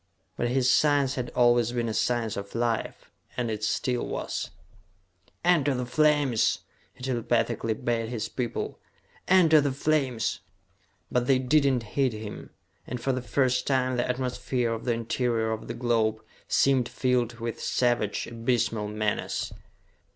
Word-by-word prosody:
But - - -1
his 125 +1 +1
science 140 0 +3
had 125 -2 -3
always 120 -1 +4
been 120 -1 -1
a 110 - -2
science 115 -2 0
of 100 +1 -7
Life, 115 -1 -2 0.3
and 120 -2 -1
it 110 0 -4
still 125 +3 0
was. - - -3 1.0
"Enter 150 -6 +3
the 125 0 -2
flames!" 145 -4 +2 0.3
he - - -14
telepathically 115 -2 0
bade 115 -1 -1
his 120 -3 -3
people. 120 -2 -4 0.5
"Enter 165 -5 +6
the 140 -1 0
flames!" 135 -4 0 0.7
But 125 0 +1
they 135 -2 +5
did 140 +2 +3
not 125 -3 0
heed 130 +3 0
him, 105 -1 -7 0.4
and 125 - -4
for 135 +3 0
the 130 - -2
first 130 0 +1
time 130 -2 +1
the 120 0 -1
atmosphere 125 -1 -1
of 115 - -6
the 120 - +2
interior 115 -1 -1
of 110 - -4
the - - -5
globe 115 -3 0 0.2
seemed 130 -3 +3
filled 125 -2 0
with 115 0 -4
savage, 120 -4 0
abysmal 115 -2 -1
menace! 105 0 -2
120 Hz, 150 wpm, -27 LUFS, 115-130 Hz, 1.0 s, Enter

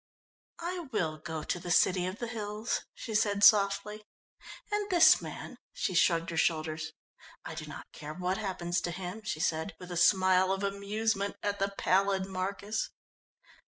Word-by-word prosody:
"I 360 +1 -2
will 160 -8 -1
go 160 0 -5
to 175 - -2
the 175 - -7
city 180 +1 +3
of 185 +2 -5
the 240 - -4
hills," 215 -1 -3
she 225 - -6
said 205 -1 +2
softly, 210 +1 +4 0.7
"and 415 -1 -1
this 350 -3 +7
man," - - -8 0.2
she 185 - -2
shrugged 170 0 +3
her 165 - -4
shoulders, 160 -1 0 0.5
"I - - -5
do - - -7
not - - -8
care 150 +1 -8
what 185 +1 -1
happens 180 -4 -2
to - - -2
him," 180 +4 -6
she 185 -7 -4
said, 160 +2 -1
with 180 0 -9
a 175 - -3
smile 185 0 +4
of 195 +1 -1
amusement 200 +1 -1
at 205 0 -1
the 195 +1 +1
pallid 195 0 +2
Marcus. 195 +3 -3
190 Hz, 165 wpm, -30 LUFS, 175-210 Hz, 0.7 s, this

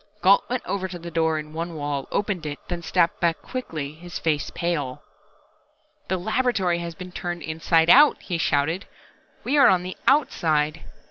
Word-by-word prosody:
Gault 195 +2 +5
went 250 0 -2
over 190 -1 -2
to 180 -1 -7
the 170 0 -8
door 160 -1 +1
in 155 0 -6
the - - -13
one 170 0 -4
wall, 145 -2 -3
opened 195 -6 -1
it, 145 -1 -4
then 175 -1 -3
stepped 170 0 +1
back 170 -2 +1
quickly, 160 - -5
his 175 +2 -8
face 150 -3 -1
pale. 155 -7 -2 1.0
"The 190 - 0
laboratory 195 -3 0
has 170 -1 -6
been 185 0 -9
turned 175 -1 -5
inside 160 +1 +2
out!" 290 +4 +7
he 175 -3 -4
shouted. 160 +5 0 0.6
"We 290 +3 +2
are 275 - +8
on 180 -2 +3
the 185 +1 -6
outside!" 165 - +2
170 Hz, 180 wpm, -24 LUFS, 160-185 Hz, 1.0 s, are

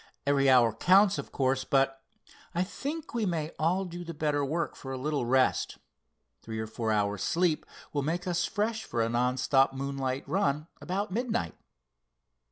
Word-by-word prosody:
Every 140 -1 +3
hour 120 -4 +6
counts, 190 - +4
of - - -7
course, 130 -1 +1
but 135 0 +1 0.5
I 175 - +2
think 290 - -5
we 230 -3 0
may 160 -3 -1
do - - -17
all 180 +5 +1
the 175 -1 -6
better 150 -1 0
work 160 +5 -1
for 135 - -8
a 130 - -3
little 140 -2 -1
rest. 130 +1 +2 0.6
Three 110 -1 -6
or 110 - -2
four 110 0 -2
hours 105 -2 0
sleep 170 - +1 0.3
will 145 - +1
make 165 +5 -2
us 175 -1 0
fresh 220 +1 -1
for 115 -11 -1
a 115 - 0
non 125 +2 +1
stop 135 +1 +3
moonlight 135 -1 -3
run 155 -3 0 0.2
about 195 +3 -2
midnight." 220 - -1
145 Hz, 175 wpm, -29 LUFS, 130-180 Hz, 0.6 s, hour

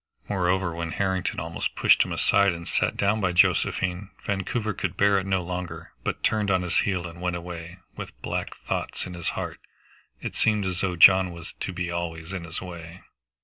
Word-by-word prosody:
Moreover, 95 -2 +1
when 85 0 -4
Harrington 95 -2 0
almost 80 +1 -3
pushed - - +5
him - - +1
aside 100 -2 +3
and 85 0 -7
sat - - 0
down 105 +2 +2
by 90 -2 +1
Josephine, 90 +2 +2 0.2
Vancouver 105 +3 -1
could 90 -2 -3
bear 100 -1 +4
it 95 - -5
no 95 -2 +1
longer, 85 -2 -5
but - - -3
turned 105 -2 +2
on 95 -2 +2
his 90 - -2
heel 90 -3 0
and 85 0 -8
went 90 -1 0
away, 85 0 -7 0.2
with - - -8
black - - -3
thoughts - - -2
in 90 - -7
his 85 -1 -2
heart. - - -4 0.6
It - - -5
seemed 105 -2 +2
as 90 -1 -2
though 95 -2 0
John 95 +2 +8
was 85 -1 -9
to - - -3
be 90 -1 -3
always 85 0 -4
in 90 -3 -4
his 80 +1 -4
way. 85 0 -9
90 Hz, 195 wpm, -26 LUFS, 85-95 Hz, 0.6 s, John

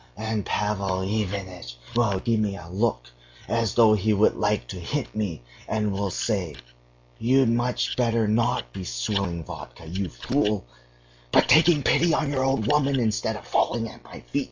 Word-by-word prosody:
And 110 -1 -2
Pavel 100 -3 -1
Ivanitch 95 - -3 0.2
will 110 -5 +2
give 115 -2 +1
me 100 -2 -1
a 85 - -10
look 95 - 0 0.4
as 115 -3 0
though 115 -2 +6
he 105 +1 +2
would 105 +1 +3
like 105 - 0
to 90 - -6
hit 140 - -3
me, 95 - -3 0.2
and 105 -1 0
will 100 0 -1
say: 95 -5 -2 0.6
'You'd 130 +1 +3
much 120 +1 0
better 115 -3 +1
not 115 - 0
be 95 - -6
swilling 85 - -2
vodka, 70 +1 -10
you 90 +3 -3
fool, 105 - -1 0.7
but - - +5
taking 155 0 +5
pity 165 +5 +3
on 150 -3 0
your 130 -2 0
old 135 -5 +1
woman 140 0 +2
instead 110 -3 0
of - - -9
falling 115 - +1
at - - -14
my - - -11
feet. - - -2
105 Hz, 170 wpm, -25 LUFS, 95-120 Hz, 0.7 s, though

